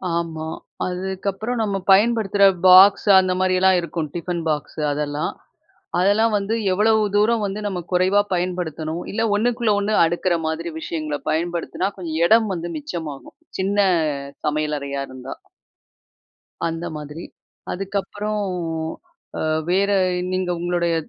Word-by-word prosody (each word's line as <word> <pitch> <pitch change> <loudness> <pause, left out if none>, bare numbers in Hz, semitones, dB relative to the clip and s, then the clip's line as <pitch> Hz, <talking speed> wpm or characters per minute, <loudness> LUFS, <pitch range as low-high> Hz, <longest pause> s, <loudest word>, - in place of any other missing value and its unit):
ஆமா. 160 -2 -3 0.4
அதுக்கப்புறம் 190 +5 -3
நம்ம 200 -2 -1
பயன்படுத்துற 205 -1 +4 0.2
பாக்ஸ், 190 +3 +7
அந்த 185 -1 +1
மாரியெல்லாம் 185 0 +3
இருக்கும். 165 -2 -4
"ஃடிபன் 175 0 -3
பாக்ஸு" 150 +1 -3
அதெல்லாம். 145 0 -2 0.7
அதெல்லாம் 210 +4 +3
வந்து 200 +3 -1 0.2
எவ்வளவு 215 +3 +3
தூரம் 215 +2 +3
வந்து 200 +2 -4
நம்ம 190 -3 -3
குறைவா 185 +3 +3
பயன்படுத்தணும். 175 -2 -3
இல்ல 225 - -1 0.2
ஒண்ணுக்குள்ள 235 -1 +1
ஒண்ணு, 210 +1 0
அடுக்குற 175 +1 0
மாதிரி 165 +1 -3
விஷயங்கள 155 -3 -3
பயன்படுத்துனா, 170 +3 -1
கொஞ்சம் 165 -3 -4
இடம் 220 +2 +4
வந்து 175 -1 -4
மிச்சமாகும். 150 -2 -7 0.2
சின்ன 200 +1 +2 0.6
சமையலறையா 150 -2 -2
இருந்தா. 130 0 -8 1.3
அந்த 165 +1 -4
மாதிரி. 150 +3 -8 0.5
அதுக்கப்புறம் 200 +2 -3 1.0
அ, - - -3 0.3
வேற 195 +3 +2 0.4
நீங்க 185 -1 -1
உங்களுடைய 175 -1 0
185 Hz, 115 wpm, -21 LUFS, 165-200 Hz, 1.3 s, பாக்ஸ்